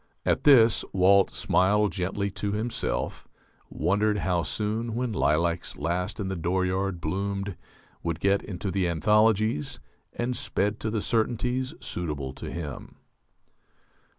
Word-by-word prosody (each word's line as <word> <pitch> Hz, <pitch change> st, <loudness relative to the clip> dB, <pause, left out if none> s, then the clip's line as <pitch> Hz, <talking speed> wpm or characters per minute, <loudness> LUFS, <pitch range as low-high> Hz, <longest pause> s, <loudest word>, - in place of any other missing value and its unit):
At -, -, +1 dB
this 120 Hz, -6 st, +6 dB
Walt 95 Hz, +1 st, +5 dB
smiled 105 Hz, +3 st, +2 dB
gently 100 Hz, +2 st, -2 dB
to 100 Hz, +1 st, -3 dB
himself, 105 Hz, -, -2 dB, 0.4 s
wondered 105 Hz, +3 st, +1 dB
how 90 Hz, -3 st, 0 dB
soon 110 Hz, +8 st, -2 dB
"When 125 Hz, -2 st, -1 dB
Lilacs 85 Hz, 0 st, 0 dB
Last 85 Hz, +6 st, -2 dB
in 100 Hz, -, -2 dB
the 95 Hz, -, -2 dB
Dooryard 95 Hz, +2 st, -1 dB
Bloomed" 100 Hz, +3 st, -2 dB, 0.5 s
would 85 Hz, -1 st, -2 dB
get 100 Hz, 0 st, +2 dB
into 95 Hz, 0 st, -4 dB
the 95 Hz, -2 st, +1 dB
anthologies, 105 Hz, -1 st, +2 dB, 0.3 s
and 120 Hz, +1 st, -2 dB
"sped 105 Hz, -1 st, -1 dB
to 110 Hz, -, -2 dB
the 110 Hz, -1 st, -2 dB
certainties 125 Hz, +4 st, 0 dB
suitable 75 Hz, -6 st, -4 dB
to -, -, -7 dB
him." 80 Hz, -5 st, -7 dB
100 Hz, 125 wpm, -27 LUFS, 90-110 Hz, 0.5 s, this